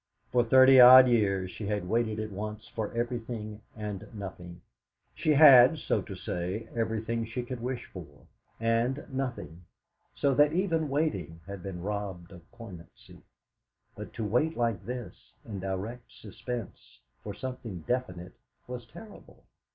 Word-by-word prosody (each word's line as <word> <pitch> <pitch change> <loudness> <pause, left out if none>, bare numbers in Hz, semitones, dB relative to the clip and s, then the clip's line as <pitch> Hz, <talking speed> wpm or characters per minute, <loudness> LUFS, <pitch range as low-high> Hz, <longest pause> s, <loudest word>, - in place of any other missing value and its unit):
For 120 -1 +3
thirty 130 +2 +7
odd 130 +1 +10
years 100 -6 +1
she 105 - -7
had 105 -3 -2
waited 110 +1 0
at 110 0 -4
once 105 +2 -6
for 110 -2 -5
everything 115 -3 -4
and 105 -2 -6
nothing; 90 -3 -9 0.5
she - - -3
had, 140 -1 +8
so - - -1
to 95 - -8
say, 90 +4 -4
everything 115 0 -2
she 115 +2 -5
could 125 0 -6
wish 125 +1 -4
for, 75 -6 -11 0.3
and 115 +4 0
nothing, 125 -10 -5 0.5
so 140 - +1
that 145 +3 +4
even 165 -4 0
waiting 95 - -2
had 100 0 -8
been 90 -2 -7
robbed 100 -4 -5
of 85 -2 -15
poignancy; 100 -9 -13 0.7
but - - -9
to 115 - -4
wait 125 +10 0
like 115 -5 -1
this, 120 -7 -8
in 105 -3 -6
direct 95 +6 -5
suspense, 110 - -8 0.3
for - - -6
something 125 -8 -7
definite 90 -5 -3 0.3
was 125 -2 -8
terrible. 210 - -14
115 Hz, 145 wpm, -29 LUFS, 95-125 Hz, 0.7 s, odd